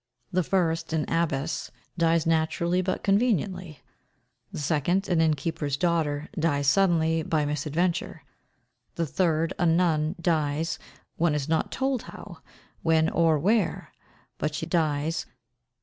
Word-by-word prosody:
The 185 0 +2
first, 165 -2 0
an 155 -2 0
abbess, 165 -2 -1 0.3
dies 165 -1 +2
naturally 165 +2 +1
but 185 0 -2
conveniently; 190 - 0 0.7
the - - -7
second, 160 +6 0
an 170 -3 +2
innkeeper's 150 -2 0
daughter, 155 -3 0
dies 145 -3 +1
suddenly, 165 0 +3
by 155 -1 0
misadventure; 155 +4 -1 0.7
the 170 - 0
third, 165 +1 0
a 175 - +3
nun, 165 -1 +2
dies, 160 -1 0 0.4
one 160 -2 +2
is 145 -1 -2
not 160 0 0
told 265 -2 -1
how, 175 -6 -11 0.4
when, 160 -1 +3
or 165 -2 +3
where 200 +4 0 0.5
but 150 0 -1
she 160 - -3
dies. 160 -1 0
165 Hz, 125 wpm, -26 LUFS, 155-175 Hz, 0.7 s, suddenly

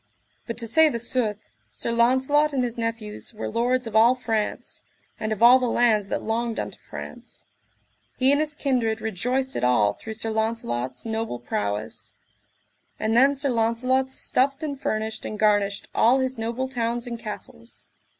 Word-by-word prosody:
But 230 - -4
to 230 -1 -3
say 315 +7 +5
the 235 - -2
sooth, 230 -3 -1 0.2
Sir - - -3
Launcelot 260 +6 +3
and 260 -2 +1
his 240 -1 -2
nephews 230 -2 -4
were 210 - -4
lords 245 +2 0
of 225 -2 -6
all 230 +3 +6
France, 225 -4 -3 0.4
and 215 - -2
of 215 +1 -1
all 250 +2 +9
the 250 -2 0
lands 220 -4 +3
that - - -3
longed 230 +1 -1
unto - - -5
France; - - -9 0.7
he 260 +1 +4
and 285 +1 +3
his 300 -1 -2
kindred 240 -6 0
rejoiced 250 +6 -2
it - - -2
all 110 -5 +3
through 220 - -8
Sir 225 0 -3
Launcelot's 130 - -2
noble 225 - -2
prowess. 105 -3 -4 0.8
And 220 +1 0
then 270 +4 +5
Sir 275 +1 -1
Launcelot 255 +3 +1
stuffed 275 +3 0
and 285 -3 -4
furnished 220 0 -2
and 215 - -5
garnished 205 -2 +1
all 245 +4 +4
his 260 0 -1
noble 235 +3 -3
towns 240 -1 -1
and 235 -1 -5
castles. 230 +2 -9
230 Hz, 170 wpm, -24 LUFS, 220-255 Hz, 0.8 s, all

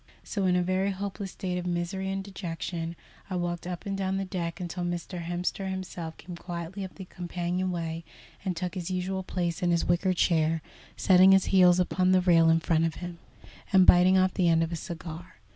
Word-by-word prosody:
So, 200 -3 -2
in 180 - +3
a 180 - +2
very 185 +2 +1
hopeless 195 -1 -5
state 180 -3 -3
of 180 - -5
misery 175 +2 -2
and 195 0 -2
dejection, 170 -3 -5 0.3
I 185 - -3
walked 175 -1 -2
up 180 -1 -5
and 200 -1 -2
down 190 0 -1
the 195 - -2
deck 175 -2 -4
until 180 0 -4
Mr. 175 +1 -4
Hemster 175 +3 -2
himself 180 -3 -5
came 175 +1 -9
quietly 175 +2 -6
up 190 - -8
the 190 - -8
companion 180 +1 -3
way 165 -2 -3 0.4
and 185 -4 -2
took 180 0 -3
his 180 -2 -4
usual 185 +1 -2
place 175 -2 -3
in 175 - +2
his 170 -1 +2
wicker 180 +2 +2
chair, 160 -2 +2 0.3
setting 185 0 +6
his 195 -1 +4
heels 180 -1 +6
upon 185 +1 +2
the 185 - +5
rail 165 -2 +5
in 165 0 +4
front 160 0 +2
of 165 - -2
him, 175 -1 -7 0.5
and 190 -1 +6
biting 180 +2 +6
off 185 0 +3
the 175 -2 +2
end 165 0 +4
of 165 - -3
a - - -2
cigar. 165 +1 -7
180 Hz, 210 wpm, -28 LUFS, 170-190 Hz, 0.5 s, setting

